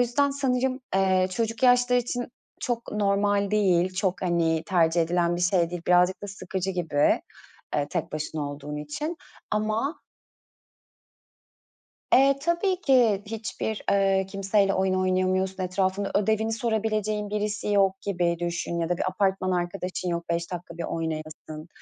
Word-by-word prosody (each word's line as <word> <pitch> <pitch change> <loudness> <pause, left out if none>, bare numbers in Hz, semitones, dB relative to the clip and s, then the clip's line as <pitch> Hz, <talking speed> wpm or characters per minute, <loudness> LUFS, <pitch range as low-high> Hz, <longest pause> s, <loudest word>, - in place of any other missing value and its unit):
yüzden 265 +4 +2
sanırım, 260 -1 0
eee, 190 -1 +3
çocuk 230 +4 -2
yaşları 245 0 +5
için 245 0 -3 0.3
çok 240 -1 -3
normal 200 -1 +1
değil, 185 -3 +2
çok, 190 0 -1
hani, 165 -3 +1
tercih 170 -2 +3
edilen 170 +1 +1
bir - - -4
şey 175 -2 +2
değil. 175 -1 -5
Birazcık 180 +1 +3
da - - -4
sıkıcı 190 -1 -4
gibi, 160 -6 +1 0.5
eee, 145 -1 0
tek - - -3
başına 155 -1 -3
olduğun 145 +1 -7
için 150 - -4 0.3
ama 215 +7 -1 2.1
Eee, 275 +1 +5
tabii 345 +3 +1
ki, 240 - +3
hiçbir, 220 0 -4
eee, 195 -1 +3
kimseyle 195 0 +1
oyun 190 0 +1
oynayamıyorsun, 185 0 0
etrafında 190 +2 -1
ödevini 220 +2 +1
sorabileceğin 215 -2 -1
birisi 210 0 -2
yok 195 -2 +2
gibi 175 -3 0
düşün 170 0 -2
ya 165 0 -1
da 175 - 0
bir - - -2
apartman 190 -2 0
arkadaşın 180 +1 -2
yok 170 -1 -3
5 170 +1 -2
dakika 175 -1 -7
bir 170 - -3
oynayasın, 155 -1 -5
190 Hz, 140 wpm, -26 LUFS, 175-215 Hz, 2.1 s, yaşları